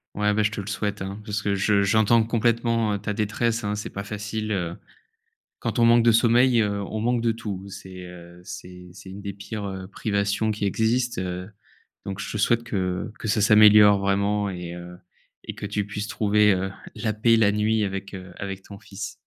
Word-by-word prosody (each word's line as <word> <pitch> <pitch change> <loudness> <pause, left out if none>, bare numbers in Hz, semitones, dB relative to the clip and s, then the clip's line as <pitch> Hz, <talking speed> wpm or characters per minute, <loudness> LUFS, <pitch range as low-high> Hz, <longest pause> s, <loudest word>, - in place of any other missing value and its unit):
Ouais, 105 0 +1
bah, 105 0 +2
je 105 - +1
te 105 - -4
le 95 - -10
souhaite 105 -1 -3
hein, 100 +2 -5
parce 105 0 -2
que 100 -2 0
je 100 +1 +2
j'entends 110 +3 +4
complètement, 115 -1 +1
heu, - - 0
ta 105 +1 -3
détresse, 110 +2 -1
hein. 105 0 -1
C'est 105 - -5
pas 100 0 -6
facile, 105 +1 -4
heu, 90 -2 -3 0.8
quand - - -3
on 115 - +5
manque 115 0 +6
de 115 0 +5
sommeil, 120 +1 +4
heu, 100 -1 -1
on 110 +2 -5
manque 120 +1 +1
de 115 0 +1
tout. 100 -4 -6
C'est, 95 -1 -9
heu, 85 0 -12
c'est 90 0 -10
c'est 95 0 -11
une 100 +2 -8
des 100 -1 -6
pires, 100 +1 -6
heu, 95 -1 -6
privations 100 +1 -1
qui 105 -1 -4
existent, 115 +3 0
heu, 90 +1 -5 0.6
donc 100 +1 -4
je - - -5
te 105 - -3
souhaite 115 +3 +2
que 95 0 -2
que 110 - -5
ça 105 0 +2
s'améliore 105 -1 +7
vraiment, 100 +1 +1
et 90 -2 -6
heu, 90 0 -9 0.5
et - - -6
que 100 - -6
tu 105 0 -2
puisses 105 +1 -5
trouver, 105 -2 +3
heu, 95 +1 -2 0.2
la 110 -2 -2
paix, 115 +2 +3
la 105 -2 +4
nuit 105 +1 +1
avec, 95 0 -5
heu, 95 -1 -9
avec 95 -1 -5
ton 100 -1 -11
fils. 100 -2 -7
105 Hz, 210 wpm, -24 LUFS, 95-110 Hz, 0.8 s, s'améliore